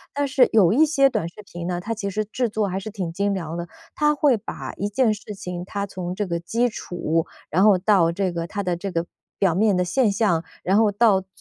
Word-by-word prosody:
但 285 0 0
是 265 -2 +4
有 200 -5 +5
一 290 +7 +5
些 275 -3 +4
短 165 - -2
视 210 +4 -13
频 175 -2 -7
呢， 175 -1 -2
它 230 +4 -3
其 205 -2 -4
实 215 +2 -1
制 245 +4 -1
作 215 -1 -1
还 190 0 -2
是 195 - -7
挺 190 -6 -4
精 200 +3 0
良 165 -3 -4
的， 170 0 -5 0.3
它 300 0 +2
会 290 -3 +3
把 - - -7
一 205 - -1
件 220 +1 +2
事 210 0 -8
情 180 -2 -6
它 200 +1 -3
从 180 -2 -5
这 205 - -1
个 170 -2 -2
基 230 +8 0
础， 165 -6 -2 0.2
然 185 +5 +3
后 205 -3 +6
到 180 -3 +3
这 185 0 -1
个 170 -1 -4
它 200 +3 -4
的 180 -2 0
这 195 +4 -5
个 170 0 -1 0.3
表 190 -4 +2
面 205 +3 +3
的 180 - +2
现 225 +4 +2
象， 195 -5 +1 0.2
然 190 +2 +2
后 220 -1 +4
到 205 -2 +4
最 190 - -20
200 Hz, 270 characters per minute, -23 LUFS, 175-220 Hz, 0.3 s, 后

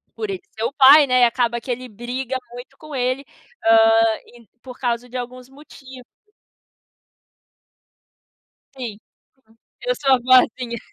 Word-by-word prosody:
por 430 -2 -5
ele 385 -2 -4
ser 220 - -7
o 235 - -1
pai, 280 +1 +7
né, 255 -1 +4
acaba 235 0 0
que 245 +2 -6
ele 250 +1 -5
briga 245 +4 -5 0.2
muito 255 +3 -12
com 310 -1 -12
ele, 255 +2 -2 0.4
hã, 225 +1 +2 0.2
por 255 -1 -11
causa 245 -1 -3
de 255 - -6
alguns 250 +1 -8
motivos. 265 -2 -15 2.7
Sim, 235 -6 -7 0.5
uhum. 225 - -26 0.3
Eu - - -1
sou 270 -2 +4
a - - +2
boazinha. 250 -1 +2
250 Hz, 135 wpm, -20 LUFS, 235-265 Hz, 2.7 s, pai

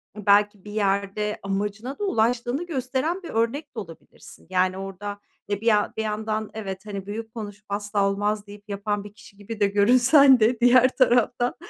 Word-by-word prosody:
belki 205 -1 +2
bir 205 - -8
yerde 200 0 -1
amacına 205 - -3
da - - -3
ulaştığını 245 - 0
gösteren 280 +4 -2
bir - - -8
örnek 250 +5 -2
de - - -3
olabilirsin. 165 -3 -13
Yani 185 0 +1
orada, 195 +1 -6 0.3
e, 205 0 -2
bir - - -9
yan 210 -2 +3
bir 220 - -1
yandan 215 0 -3
evet, 195 -2 -6
hani, 200 -2 -6
büyük 220 +2 -6
konuşup, 205 -2 -8
"Asla 205 0 0
olmaz," 205 +1 -2
deyip 205 +1 -13
yapan 205 0 -2
bir 205 0 -11
kişi 200 -2 -17
gibi 215 +2 -8
de 205 - +4
görünsen 250 +6 +5
de 225 +2 +2
diğer 250 +1 +6
taraftan 245 -1 +2
210 Hz, 175 wpm, -24 LUFS, 200-240 Hz, 0.3 s, diğer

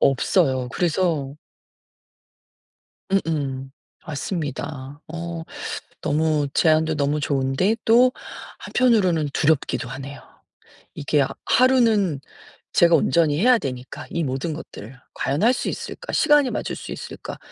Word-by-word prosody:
없어요. 130 -2 +2
그래서 160 -5 0 1.8
음음. 140 -8 -1 0.4
맞습니다. 145 -3 -5
어 170 0 -5 0.6
너무 150 -1 +1
제안도 160 0 +3
너무 145 +1 0
좋은데 140 +8 +1
또 245 +3 +6 0.5
한편으로는 185 - +2
두렵기도 145 -5 +1
하네요. 135 +2 -8 0.7
이게 145 0 +1
아 135 - 0 0.2
하루는 225 - +3 0.5
제가 170 -1 +5
온전히 155 -3 +3
해야 245 +1 +5
되니까 125 -4 -6
이 170 - -1
모든 135 +5 -2
것들을. 125 -5 -9 0.2
'과연 140 +7 -1
할 240 +3 +5
수 - - -3
있을까 - - -6
시간이 295 -4 +4
맞을 - - -3
수 - - -8
있을까' - - -8
155 Hz, 255 characters per minute, -23 LUFS, 140-185 Hz, 1.8 s, 또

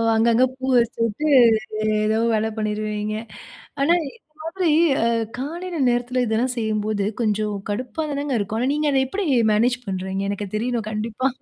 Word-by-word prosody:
அங்கங்க 230 +2 +4
பூ 260 - -5
வச்சுவிட்டு, 230 +4 -1 0.8
ஏதோ 220 +1 +1 0.2
வேல 220 0 +1
பண்ணிருவீங்க. 215 0 -2 0.7
ஆனா, 305 +5 +4 0.2
இந்த - - -19 0.2
மாதிரி 330 +1 -1 0.3
அ - - +2 0.3
காலையில 340 +6 -5
நேரத்தில 245 +1 0
இதெல்லாம் 235 +3 0
செய்யும்போது 215 -2 -1 0.2
கொஞ்சம் 210 -1 0
கடுப்பா 250 +9 -3
தானங்க 285 -2 -1
இருக்கும். 210 +2 -2
ஆனா, 255 +3 +1
நீங்க 300 0 +1
அத 270 - +3
எப்படி 385 +9 -3 0.3
மேனேஜ் 240 +4 +2
பண்ணுறீங்க. 190 0 -3
எனக்கு 205 0 -3
தெரியணும் 230 0 -2
கண்டிப்பா. 220 +4 -1
230 Hz, 140 wpm, -22 LUFS, 215-260 Hz, 0.8 s, அங்கங்க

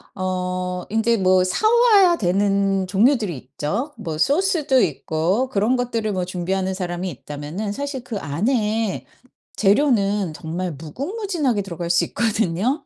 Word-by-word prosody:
어 180 -1 -2
인제 225 +2 +2
뭐 185 -1 +4
사 310 - +1
와야 425 -7 +5
되는 195 0 +1
종류들이 210 - +2
있죠. 150 - -4
뭐 165 -8 -5
소스도 295 - +2
있고 170 - 0
그런 215 +3 +1
것들을 230 -4 -1
뭐 185 -2 -1
준비하는 185 +1 -2
사람이 180 0 -3
있다면은 150 - -6
사실 280 +1 -4
그 230 -4 -5
안의 215 - -1 0.5
재료는 205 - +2
정말 170 +2 -4
무궁무진하게 280 - -2
들어갈 170 -3 -5
수 170 - +3
있거든요 225 - -1
200 Hz, 290 characters per minute, -21 LUFS, 180-250 Hz, 0.5 s, 와야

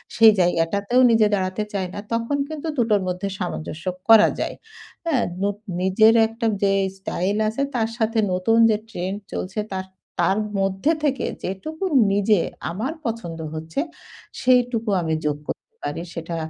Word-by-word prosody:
সেই 225 -1 +8
জায়গাটাতেও 185 +7 +2
নিজে 225 -2 +5
দাঁড়াতে 190 +1 0
চায় 190 -2 -1
না। - - -5
তখন 230 +5 0
কিন্তু 310 0 -5
দুটোর 220 -4 +2
মধ্যে 180 +2 -2
সামঞ্জস্য 175 -2 -5 0.2
করা 220 -1 +9
যায় - - -2 0.5
এ্যা? 320 -5 +2 0.2
নোত 200 +1 0 0.2
নিজের 215 +4 +5
একটা 230 +1 -5 0.2
যে 195 - +4 0.3
style 190 +1 -2
আছে 225 +6 -2
তার 225 -2 +1
সাথে 225 -1 +1
নতুন 205 +5 +2
যে 215 - +3
trend 190 -1 -3 0.2
চলছে 190 +3 -3
তার 190 0 -3 0.4
তার 195 +2 +2 0.2
মধ্যে 195 +9 +1
থেকে 275 -4 +1 0.2
যেটুকু 310 - -5 0.3
নিজে 205 0 +3 0.3
আমার 230 - -3
পছন্দ 185 -8 -4
হচ্ছে 160 - -4 0.6
সেইটুকু 245 -3 +2
আমি 160 -1 -1
যোগ 150 -1 0
করতে - - -7
পারি। 145 +3 -3
সেটা 165 0 -5
205 Hz, 150 wpm, -23 LUFS, 185-230 Hz, 0.6 s, করা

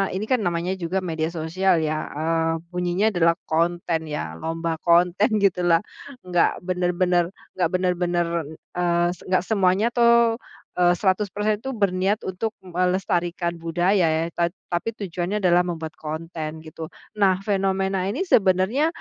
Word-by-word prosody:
ini 205 - -2
kan 255 - +4
namanya 175 +2 -1
juga 175 +3 -1
media 160 -1 -1
sosial 170 +3 +1
ya, 155 0 0 0.2
eee, 165 +1 +1 0.2
bunyinya 180 +3 0
adalah 170 -2 +3
konten 170 0 0
ya, 80 - -4
lomba 165 0 -2
konten 175 +5 +3
gitulah, 175 -3 +3 0.5
nggak 175 -1 +3 0.2
bener-bener 180 -1 +2 0.3
nggak 180 -3 +1
bener-bener, 180 -1 +1 0.5
eee, 175 -1 +2
s 180 - -16
enggak 185 -1 +1
semuanya 200 0 +2
tuh, 235 -1 +5 0.4
eee, 175 -1 +5
100% 210 +2 0
tuh 265 - -3
berniat 195 +1 +1
untuk 200 +4 -2
melestarikan 180 -1 -1
budaya 175 +3 +2
ya 160 +1 +1
ta 170 0 +1 0.2
tapi 175 +6 0
tujuannya 185 +1 -3
adalah 180 0 +4
membuat 160 -2 -4
konten, 160 0 -5
gitu. 155 0 -7 0.3
Nah 190 -2 +4
fenomena 195 -1 0
ini 360 - -1
sebenarnya 195 - +3
180 Hz, 135 wpm, -23 LUFS, 170-190 Hz, 0.5 s, tuh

